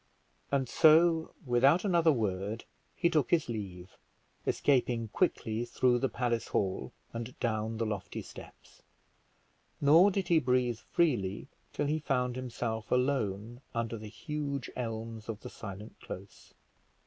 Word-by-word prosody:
And 135 Hz, -2 st, +1 dB
so 160 Hz, +3 st, +5 dB
without 135 Hz, -, +4 dB
another 170 Hz, -4 st, +4 dB
word 105 Hz, -2 st, -2 dB, 0.3 s
he 170 Hz, -, +2 dB
took 155 Hz, -7 st, +2 dB
his 170 Hz, -3 st, +2 dB
leave, 95 Hz, -5 st, -6 dB, 0.6 s
escaping 120 Hz, -5 st, +2 dB
quickly 115 Hz, -, 0 dB
through 120 Hz, 0 st, +2 dB
the 135 Hz, -, +1 dB
palace 120 Hz, -1 st, -1 dB
hall, 95 Hz, -9 st, -1 dB, 0.2 s
and 115 Hz, +2 st, -6 dB
down 110 Hz, -1 st, -1 dB
the 115 Hz, -, 0 dB
lofty 105 Hz, -3 st, -4 dB
steps; -, -, -13 dB, 1.0 s
nor 160 Hz, +7 st, +7 dB
did 195 Hz, -1 st, -2 dB
he 170 Hz, -2 st, +6 dB
breathe 125 Hz, -3 st, +1 dB
freely 120 Hz, -, 0 dB, 0.2 s
till -, -, -1 dB
he 155 Hz, +2 st, 0 dB
found 125 Hz, -4 st, 0 dB
himself 120 Hz, -3 st, -4 dB
alone 120 Hz, -3 st, 0 dB
under 115 Hz, 0 st, -1 dB
the 110 Hz, -1 st, -8 dB
huge 140 Hz, +3 st, -4 dB
elms 115 Hz, -2 st, -5 dB
of 110 Hz, -1 st, -4 dB
the 125 Hz, -, -8 dB
silent 105 Hz, +1 st, -8 dB
close. 95 Hz, +1 st, -10 dB
120 Hz, 135 wpm, -31 LUFS, 110-140 Hz, 1.0 s, nor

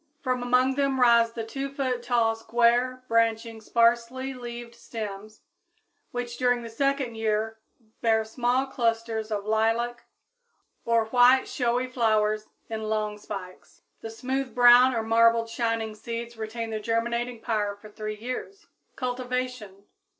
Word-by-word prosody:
From 255 Hz, -2 st, 0 dB
among 250 Hz, +2 st, +3 dB
them 275 Hz, -1 st, 0 dB
rise 235 Hz, -2 st, +5 dB
the 230 Hz, -, -4 dB
2 270 Hz, +4 st, -4 dB
foot 255 Hz, -3 st, -1 dB
tall, 235 Hz, -2 st, +2 dB
square, 240 Hz, +3 st, +1 dB
branching, 230 Hz, 0 st, +1 dB
sparsely 235 Hz, +4 st, +1 dB
leaved 240 Hz, -1 st, -8 dB
stems, 215 Hz, -2 st, -8 dB, 0.7 s
which 240 Hz, -1 st, -5 dB
during 245 Hz, -1 st, +1 dB
the 230 Hz, -, -8 dB
second 275 Hz, 0 st, 0 dB
year 220 Hz, 0 st, -1 dB, 0.4 s
bear 220 Hz, -1 st, +2 dB
small 245 Hz, +3 st, 0 dB
clusters 230 Hz, -3 st, -1 dB
of 205 Hz, -2 st, -3 dB
lilac 225 Hz, +2 st, 0 dB, 0.8 s
or 230 Hz, -1 st, +2 dB
white 250 Hz, +3 st, +5 dB
showy 245 Hz, 0 st, 0 dB
flowers 215 Hz, -4 st, +1 dB, 0.2 s
in 220 Hz, -1 st, -4 dB
long 215 Hz, -1 st, -1 dB
spikes. 185 Hz, -3 st, -9 dB, 0.2 s
The 225 Hz, -, -6 dB
smooth 260 Hz, +3 st, -3 dB
brown 245 Hz, +1 st, +7 dB
or 225 Hz, -, 0 dB
marbled 230 Hz, 0 st, +3 dB
shining 230 Hz, -2 st, -1 dB
seeds 235 Hz, +2 st, -6 dB
retain 225 Hz, +1 st, -5 dB
their 215 Hz, -, -2 dB
germinating 235 Hz, +2 st, -1 dB
power 210 Hz, -3 st, -1 dB
for 205 Hz, +1 st, -14 dB
three 215 Hz, 0 st, -5 dB
years. 255 Hz, -, -6 dB, 0.3 s
_Cultivation. 250 Hz, -5 st, -4 dB
235 Hz, 135 wpm, -26 LUFS, 220-250 Hz, 0.8 s, brown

